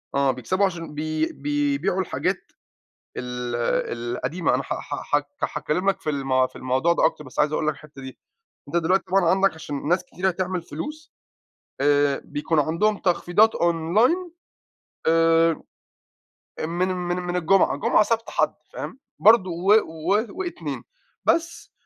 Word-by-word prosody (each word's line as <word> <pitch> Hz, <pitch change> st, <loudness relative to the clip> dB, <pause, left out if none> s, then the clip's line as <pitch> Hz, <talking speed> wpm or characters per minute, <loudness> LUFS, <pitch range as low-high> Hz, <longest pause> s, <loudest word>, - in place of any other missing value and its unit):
آه، 140 Hz, -1 st, +3 dB
بيكسَبوا 185 Hz, +11 st, 0 dB
عشان 165 Hz, -4 st, -4 dB
بي 155 Hz, +1 st, -1 dB
بيبيعوا 145 Hz, +5 st, 0 dB
الحاجات 185 Hz, -, -2 dB, 0.7 s
ال 125 Hz, -1 st, -4 dB
ال 120 Hz, 0 st, -1 dB
القديمة. 170 Hz, +1 st, 0 dB
أنا -, -, -2 dB
ح -, -, -3 dB
ح -, -, -5 dB, 0.4 s
ح -, -, -1 dB
هاتكلَّم 180 Hz, +6 st, 0 dB
لك 195 Hz, -, -1 dB
في -, -, -2 dB
ال 135 Hz, -3 st, +1 dB
في -, -, -25 dB
الموضوع 130 Hz, +6 st, +1 dB
ده 165 Hz, -, +2 dB
أكتَر، 155 Hz, -, 0 dB
بس 130 Hz, -, -9 dB
عايِز 150 Hz, 0 st, +3 dB
أقول 155 Hz, -, 0 dB
لك 155 Hz, -, +2 dB
الحتَّة 145 Hz, -1 st, -14 dB
دي. 130 Hz, 0 st, -9 dB, 0.5 s
أنتَ 165 Hz, -, -3 dB
دلوقتي 175 Hz, +3 st, +2 dB
طبعًا 190 Hz, 0 st, +2 dB
عندك، 195 Hz, 0 st, +3 dB
عشان 145 Hz, -2 st, -5 dB
ناس 180 Hz, +3 st, +2 dB
كتيرة 190 Hz, +1 st, -1 dB
تعمل 185 Hz, 0 st, -2 dB
فلوس، 300 Hz, -, -7 dB, 0.7 s
آآ، 145 Hz, -1 st, +3 dB
بيكون 150 Hz, +2 st, -1 dB
عندهم 170 Hz, +8 st, +1 dB
تخفيضات 185 Hz, +4 st, +3 dB
online 210 Hz, -, +2 dB, 0.8 s
آآ، 165 Hz, 0 st, +4 dB, 1.1 s
آآ، -, -, -1 dB
من 175 Hz, +3 st, 0 dB
من 180 Hz, -1 st, -2 dB
من 180 Hz, 0 st, -3 dB
الجمعة، 180 Hz, -2 st, +3 dB
جمعة، 145 Hz, -, +3 dB
سبت، 230 Hz, +1 st, -1 dB
حد -, -, +1 dB, 0.2 s
فاهم؟ -, -, -6 dB, 0.2 s
برضو 215 Hz, -3 st, +6 dB
و 180 Hz, +5 st, +3 dB
و 175 Hz, +7 st, -1 dB
واتنين. 360 Hz, -1 st, -5 dB, 0.4 s
بس 335 Hz, +1 st, 0 dB
165 Hz, 155 wpm, -24 LUFS, 145-190 Hz, 1.1 s, برضو